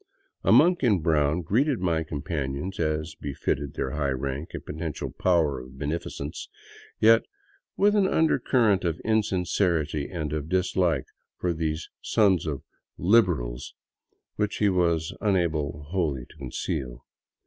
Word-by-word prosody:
A - - +3
monk 175 0 +6
in 115 -7 +4
brown 80 +1 +2
greeted 125 - +1
my 85 -3 +1
companions 75 +2 -4
as 80 0 -1
befitted 70 0 -3
their - - -2
high 75 -2 -1
rank 70 +3 -3
and - - -7
potential 80 0 -4
power 80 -7 +1
of 65 +1 -12
beneficence; 75 0 -4 0.5
yet 115 +1 +6 0.6
with 205 +1 +4
an 200 -2 +4
undercurrent 125 - +2
of 85 -2 -1
insincerity 90 -8 0
and 80 -5 -4
of 75 0 -3
dislike 90 -1 +1 0.3
for 90 -1 0
these 80 0 -2
sons 95 -6 +2
of 70 -3 -3 0.2
" - - -62 0.2
Liberals," 60 - +2 0.6
which 105 -1 0
he 105 - +3
was 85 -3 +1
unable 80 -8 0
wholly 75 -10 -1
to - - -18
conceal. 65 -2 -4
80 Hz, 135 wpm, -26 LUFS, 75-95 Hz, 0.6 s, monk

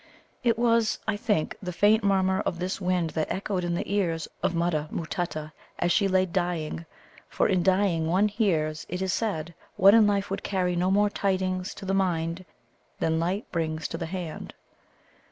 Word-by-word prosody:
It 230 -2 +2
was, 230 -2 +2
I 220 - +1
think, 205 -7 0
the 180 -2 -4
faint 205 +5 +3
murmur 190 -1 +2
of 170 - -2
this 185 +3 -3
wind 180 -3 0
that 155 -1 -2
echoed 190 -1 -2
in 175 0 -1
the - - -1
ear 190 -5 +1 0.2
of 175 - 0
Mutta 165 -3 0
matutta 160 -2 -4 0.3
as 175 - +1
she 200 +2 +3
lay 185 -1 +3
dying, 170 -3 -2 0.4
for - - +1
in 185 -2 +2
dying 185 -3 +2
one 190 +5 +3
hears, 165 -8 0
it 180 +2 -2
is 190 -2 0
said, 170 -7 -2 0.2
what 195 +2 +7
in 220 -2 +6
life 200 -1 0
would 195 - -2
carry 180 -2 0
no 180 +2 +1
more 205 +1 +3
tidings 185 -2 -1
to - - -9
the 190 - -1
mind 175 -2 0 0.5
than 160 0 0
light 180 +5 -1
brings 160 -2 -2
to - - -4
the 165 - -3
hand. 175 -3 -6
185 Hz, 185 wpm, -27 LUFS, 170-200 Hz, 0.5 s, what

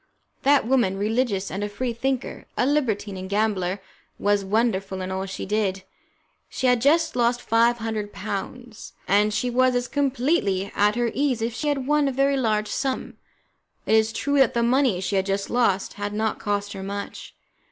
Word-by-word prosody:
That 280 -2 +4
woman, 235 -7 +2
religious 210 -1 0
and 195 +2 -3
a 205 - -2
Free 240 +4 -3
thinker, 260 +2 -3
a - - +2
libertine 225 -9 0
and 185 0 -7
gambler, 200 -2 0 0.4
was 205 0 +1
wonderful 195 -2 0
in 185 0 -4
all 190 +1 -3
she 190 - -5
did. 195 -2 -1 0.7
She - - -3
had 250 -2 +4
just 305 +4 +3
lost 240 0 +2
five 235 +1 +2
hundred 220 -2 -4
pounds, 235 +3 -6
and 205 +2 +3
she 245 +4 -1
was 255 +1 +3
as 245 0 0
completely 260 - 0
at 210 +1 +3
her 240 -1 0
ease 265 -5 0
as 230 - +1
if - - -12
she 300 +6 -3
had 280 -3 0
won 295 0 +2
a - - +1
very 275 +2 +2
large 215 -5 0
sum. 270 -1 -3 0.7
It - - +1
is 220 0 +4
true 285 +4 0
that 265 -3 +4
the 235 - +2
money 245 -6 +2
she 195 +1 -1
had 190 +1 0
just 195 0 -2
lost 230 -6 +1
had 205 0 -4
not 220 +1 -1
cost 205 0 -2
her 195 - -7
much. 200 +1 -6
225 Hz, 190 wpm, -24 LUFS, 200-255 Hz, 0.7 s, That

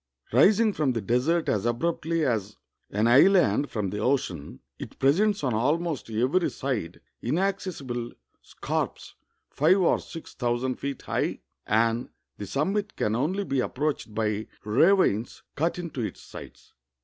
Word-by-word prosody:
Rising 210 - +5
from 145 -7 0
the 115 - -2
desert 130 - +1
as 100 -3 +1
abruptly 160 +5 0
as 105 -5 -1 0.3
an 105 +2 0
island 140 - +5
from 105 -4 -2
the 105 - -4
ocean, 105 - -1 0.2
it - - -9
presents 190 +8 +2
on 130 -4 +1
almost 150 +5 0
every 130 +11 +1
side 120 -11 -4 0.2
inac 190 +10 +1
cessible 130 -11 -5 0.3
scarps - - -4 0.4
five 165 +7 +3
or 180 - +3
sLx 165 - -10
thousand 125 +1 -1
feet 140 -2 -5
high, - - -2 0.3
and 115 +2 +1 0.3
the 100 - -5
sum 150 - 0
mit 210 +1 -2
can 105 +1 0
only 170 - 0
be 135 -8 -1
approached 135 -4 -2
by 110 -1 -1 0.2
ravines 120 - +2
cut 165 +4 -1
into 170 -7 -5
its 110 - -4
sides. - - -12
135 Hz, 145 wpm, -26 LUFS, 115-170 Hz, 0.4 s, Rising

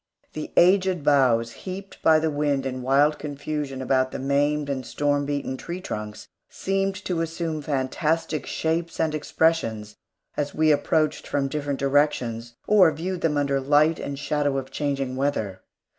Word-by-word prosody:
The 155 - -6
aged 185 -2 +4
boughs 125 -6 +3
heaped 195 +5 -8
by 160 -1 +5
the 155 0 0
wind 145 -2 0
in 130 -1 -3
wild 145 +4 +3
confusion 145 -2 -4
about 130 0 +2
the - - -6
maimed 145 +2 +1
and 135 -2 -3
storm 145 +2 0
beaten 140 -2 -2
tree 175 +5 -6
trunks 105 - -6 0.2
seemed 195 0 -1
to 175 -3 -1
assume 165 -1 -3
fantastic 150 +2 -1
shapes 165 +1 -2
and 160 -1 +1
expressions 145 -9 0 0.4
as 145 -1 -3
we 155 0 +4
approached 155 +1 +1
from 140 -1 -1
different 145 -1 -2
directions, 130 -5 0
or 195 -6 +6
viewed 175 +4 -4
them 150 -3 +1
under 140 -1 +1
light 150 +4 +3
and 140 0 -5
shadow 145 0 0
of 135 -1 -5
changing 135 -3 -2
weather. 110 -9 -1
145 Hz, 155 wpm, -24 LUFS, 135-160 Hz, 0.4 s, or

